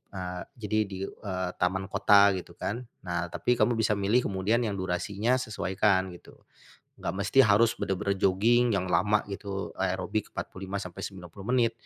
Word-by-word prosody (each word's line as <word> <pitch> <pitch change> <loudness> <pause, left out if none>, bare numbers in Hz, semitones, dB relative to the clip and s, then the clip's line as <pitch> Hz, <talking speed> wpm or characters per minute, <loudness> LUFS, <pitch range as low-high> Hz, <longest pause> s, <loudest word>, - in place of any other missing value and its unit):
eee, 90 -1 -4 0.2
jadi, 110 -1 -1
di 95 - -6
eee, 95 -3 -4
taman 95 +2 0
kota 100 -1 +6
gitu 85 -1 -9
kan. 120 +4 -4 0.2
Nah, 85 -1 -2
tapi 125 - 0
kamu 120 - +4
bisa 110 -1 +2
milih 105 +5 +2
kemudian 100 +5 +1
yang 105 -3 -1
durasinya 100 +6 0
sesuaikan, 95 -4 +1
gitu. - - -16 0.6
Enggak 85 - -3
mesti 135 +6 +4
harus 110 +2 +4
benar-benar 100 +1 -1
jogging 115 +5 +3
yang 95 - -1
lama 105 +3 +3
gitu, 100 -1 -5
aerobik - - -1
45 95 +1 -5
sampai 90 -3 -7
90 95 0 -9
menit. 120 -2 +3
100 Hz, 155 wpm, -28 LUFS, 95-110 Hz, 0.6 s, kota